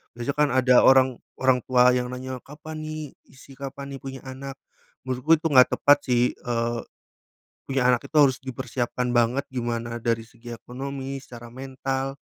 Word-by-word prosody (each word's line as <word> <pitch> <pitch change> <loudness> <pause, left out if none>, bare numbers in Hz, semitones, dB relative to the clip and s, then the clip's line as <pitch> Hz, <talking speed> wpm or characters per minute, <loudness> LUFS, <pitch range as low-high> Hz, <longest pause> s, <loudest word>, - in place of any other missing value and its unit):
Biasanya 120 +4 -3
kan 150 -1 +3
ada 130 -1 +4
orang 130 -2 +5 0.2
orang 130 -1 +4
tua 125 -1 +5
yang 125 0 -1
nanya, 130 0 -5
"Kapan 155 +2 -8
nih 155 0 -5 0.3
isi, 135 +1 -16
kapan 140 0 -7
nih - - -15
punya 135 -1 -7
anak?" 135 +1 -7 0.5
menurutku 130 +5 +2
itu 160 - -1
enggak 130 -2 +6
tepat 145 0 +5
sih, 125 -1 +3
eee, 120 -1 -2 0.9
punya 135 -1 0
anak 120 -1 +2
itu - - -24
harus 135 -4 +5
dipersiapkan 125 -1 -3
banget 120 +3 +2
gimana 120 -2 -3
dari 115 -1 0
segi 120 +1 -10
ekonomi, 135 +3 -6
secara 120 -3 -11
mental, 135 +1 -4
130 Hz, 160 wpm, -25 LUFS, 120-135 Hz, 0.9 s, enggak